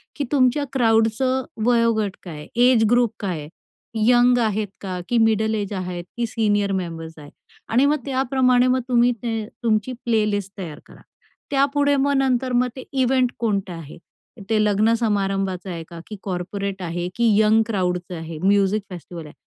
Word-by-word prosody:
की 290 - -2
तुमच्या 270 0 +3
क्राउडचं 235 +2 +2 0.2
वयोगट 230 -4 +2
काय 170 -5 -8
आहे, 150 - -10
एज 245 -1 +5
ग्रुप 240 -2 +3
काय 185 -6 -3
आहे. 150 0 -9 0.6
यंग 245 0 +5
आहेत 215 -2 0
का, 185 -2 -4
की 240 - +2
मिडल 220 -1 +2
एज 205 -1 -3
आहेत, 180 -2 -4
की 240 - 0
सीनियर 205 -3 0
मेंबर्स 165 -4 -4
आहेत 145 -1 -12 0.4
आणि 250 +5 +4
मग 295 +2 +3
त्याप्रमाणे 255 -2 +2
मग 255 +1 +2
तुम्ही 245 -1 +3
ते 225 -2 -2 0.2
तुमची 220 +2 +1
प्लेलिस्ट 210 -4 0
तयार 170 -6 -7
करा. - - -17 0.5
त्यापुढे 285 +1 +2
मग 280 +1 +1
नंतर 260 -1 +1
मग 245 +1 +3
ते 260 - -7
इव्हेंट 260 -2 +2
कोणतं 200 -5 -1
आहे. 165 -3 -10 0.5
ते 215 -1 +3
लग्न 210 +2 +3
समारंभाचं 195 -4 -1
आहे 170 -2 -5
का, 170 - -9
की 215 - -7
कॉर्पोरेट 195 +1 -4
आहे, 175 0 -3
की 235 0 +2
यंग 215 +1 +4
क्राउडचं 180 -4 -2
आहे, 165 -1 -7
म्युझिक 200 +1 +3
फेस्टिवल 175 -2 -9
आहे. 150 - -12
215 Hz, 165 wpm, -22 LUFS, 190-245 Hz, 0.6 s, एज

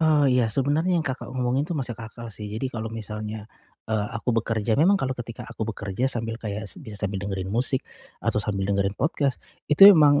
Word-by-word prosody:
Oh, 155 -3 +4
iya, 125 -2 +3
sebenernya 145 - +1
yang 175 - +3
Kakak 135 -4 -4
ngomongin 130 +2 0
itu 175 - -4
masuk 125 -6 -2
akal 115 +1 -9
sih, 105 -1 -8
jadi 120 +5 -2
kalau 110 -2 -5
misalnya, 105 0 -6 0.4
eee, 110 -2 0
aku 115 +2 -5
bekerja, 110 0 0
memang 170 +7 +5
kalau 130 -1 -1
ketika 115 -1 -7
aku 110 - -4
bekerja 105 +5 -3
sambil 115 -3 -1
kayak 105 -2 -5
s - - -8
bisa 110 - -6
sambil 100 -1 -2
dengerin 95 -2 -3
musik 125 +5 +2 0.4
atau - - -1
sambil 100 -2 -1
dengerin 100 0 +1
podcast, 140 0 -1 0.3
itu 195 +7 +10
emang, 150 -7 +7
115 Hz, 200 wpm, -25 LUFS, 105-135 Hz, 0.4 s, itu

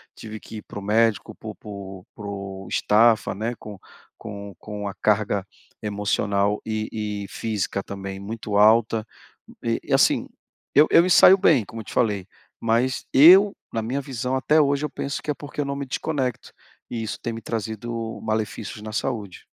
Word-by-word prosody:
tive 110 -1 -8
que 110 - -10
ir - - -6
para - - -11
o - - -4
médico, 110 0 +1
por - - -9
por 100 -2 -9
por 100 -2 -7
estafa, 110 +1 +3
né, 115 +4 -3
com 105 -2 -10 0.4
com 100 -2 -8
com 105 -1 -6
a 100 - -4
carga 105 -2 +1 0.4
emocional 100 -1 0
e 110 -1 -3
e - - -7
física 105 -3 -2
também, 95 0 -7
muito 105 0 -4
alta. 110 +1 +4 0.6
E - - 0
e - - -3
assim, - - +3 0.5
eu 150 +2 +7
eu - - +8
me 185 - 0
saio 185 +1 +8
bem, 145 - +4
como 115 - -9
eu 110 - -13
te - - -9
falei, 105 -6 +1 0.3
mas 120 +3 +1
eu, 190 +8 +8 0.2
na 115 - -1
minha 130 +6 -2
visão, 130 -1 -3
até 150 +4 +3
hoje 140 0 +1
eu - - -3
penso 140 +1 -4
que 150 - -1
é - - 0
porque 145 0 -6
eu - - -2
não 140 - -3
me 140 0 -4
desconecto 130 -2 -3 0.4
e 115 - -3
isso 110 - -5
tem 120 - -3
me 115 - -7
trazido 115 +1 -4
malefícios 110 -1 -3
na 110 0 -7
saúde. 105 -5 -4
110 Hz, 180 wpm, -24 LUFS, 100-125 Hz, 0.6 s, eu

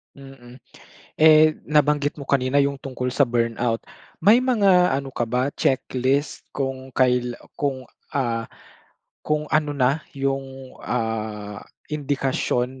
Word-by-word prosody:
Mm. 135 -3 -13 0.6
Eh, 155 0 +6
nabanggit 150 -1 +1
mo 140 - -8
kanina 135 0 +2
'yong 140 0 +2
tungkol 130 -2 -4
sa - - +4
burnout. 115 -2 0 0.4
May 220 +8 +5
mga 200 -8 +4
ano 135 -2 -8
ka - - -1
ba 125 +3 0
checklist 130 +2 0
kung 135 -1 -4
kail 125 -2 +1 0.2
kung 135 -3 -3 0.2
ah, 115 -4 -2 0.7
kung 150 0 -1
ano 150 -1 +1
na 135 +3 +2 0.2
'yong, 135 -1 -3
ah, 110 -3 -3 0.3
indikasyon 130 -3 -1
135 Hz, 115 wpm, -23 LUFS, 125-145 Hz, 0.7 s, Eh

